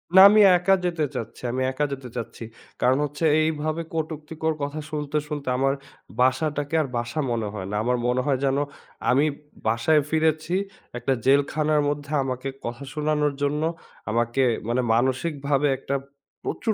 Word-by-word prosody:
না 190 - +11
আমি 215 +1 +6 0.2
একা 185 +2 +3
যেতে 170 -3 0
চাচ্ছি। 115 - -6
আমি 130 - -2
একা 150 +3 0
যেতে 130 -2 -7
চাচ্ছি। 115 0 -6 0.4
কারণ 130 +2 +4
হচ্ছে 145 +3 -3 0.2
এইভাবে 155 +1 -1
কটুক্তিকর 160 0 -2
কথা 145 +2 -3
শুনতে, 150 -1 -2
শুনতে 145 -3 -5
আমার 135 +1 +2 0.5
বাসাটাকে 145 +4 +1
আর 145 - -2
বাসা 120 +5 -3
মনে 115 -2 -1
হয় 95 -3 -5
না। - - -2
আমার 125 +1 +1
মনে 125 +1 +2
হয় 135 -3 +1
যেন, 135 0 +2 0.5
আমি 140 +4 +4 0.4
বাসায় 115 +8 +3
ফিরেছি 160 +2 +1 0.4
একটা 120 +3 0
জেলখানার 150 +2 +3
মধ্যে 145 0 -4
আমাকে 130 0 -3 0.2
কথা 120 +4 -5
শোনানোর 150 -1 +1
জন্য 145 +2 0 0.5
আমাকে 120 +3 +1 0.3
মানে 120 +2 +1
মানসিকভাবে 140 +3 +1
একটা 140 +1 -3 0.5
প্রচুর 225 - -1
145 Hz, 150 wpm, -24 LUFS, 130-155 Hz, 0.5 s, না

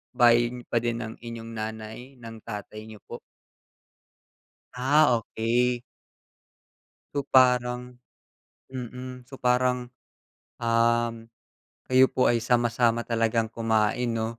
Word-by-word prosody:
bahay 120 -1 +5 0.2
pa 115 - +3
din 120 0 -2
ng 110 -1 -5
inyong 115 -1 -8
nanay 110 0 -6 0.2
ng 115 -2 -10
tatay 110 0 -8
niyo 110 -2 -11
po? - - -8 1.6
Ah, 135 +1 +4
okey. 120 +3 0 1.3
So 140 - -2
parang 125 -1 +2 0.7
mm, 125 0 -8
so 135 - -10
parang, 125 0 +1 0.6
um, 115 0 +1 0.6
kayo 130 0 +6
po 130 - +2
ay 115 -1 +1
sama-sama 120 -1 +2
talagang 115 -1 +1
kumain 115 +1 0
'no? 110 -1 -1
120 Hz, 105 wpm, -26 LUFS, 115-125 Hz, 1.6 s, kayo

